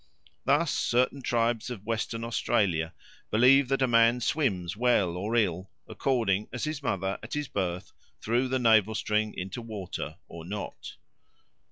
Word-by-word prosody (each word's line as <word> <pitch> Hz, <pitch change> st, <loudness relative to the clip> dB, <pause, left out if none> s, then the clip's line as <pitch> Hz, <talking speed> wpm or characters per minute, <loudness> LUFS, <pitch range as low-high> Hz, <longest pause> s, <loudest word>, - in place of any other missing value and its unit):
Thus 150 Hz, +2 st, +3 dB
certain 125 Hz, +3 st, +1 dB
tribes 120 Hz, -2 st, 0 dB
of 110 Hz, -5 st, -7 dB
Western 115 Hz, 0 st, -2 dB
Australia 95 Hz, -8 st, 0 dB, 0.3 s
believe 130 Hz, +5 st, +5 dB
that 135 Hz, +1 st, +1 dB
a -, -, +3 dB
man 115 Hz, 0 st, +4 dB
swims 100 Hz, -, -1 dB
well 105 Hz, -7 st, +2 dB
or 105 Hz, +6 st, -2 dB
ill, 95 Hz, -4 st, 0 dB, 0.2 s
according 110 Hz, -7 st, 0 dB
as 125 Hz, -, -5 dB
his 155 Hz, -1 st, -3 dB
mother 95 Hz, -7 st, -2 dB
at 110 Hz, -, -8 dB
his 150 Hz, -1 st, -2 dB
birth 90 Hz, -5 st, -3 dB, 0.3 s
threw 120 Hz, +4 st, 0 dB
the 130 Hz, +1 st, 0 dB
navel 110 Hz, -3 st, +4 dB
string 110 Hz, 0 st, 0 dB
into 95 Hz, +6 st, -5 dB
water 105 Hz, -6 st, -6 dB
or 85 Hz, -1 st, -9 dB
not. 100 Hz, +4 st, -7 dB
115 Hz, 150 wpm, -28 LUFS, 95-125 Hz, 0.3 s, believe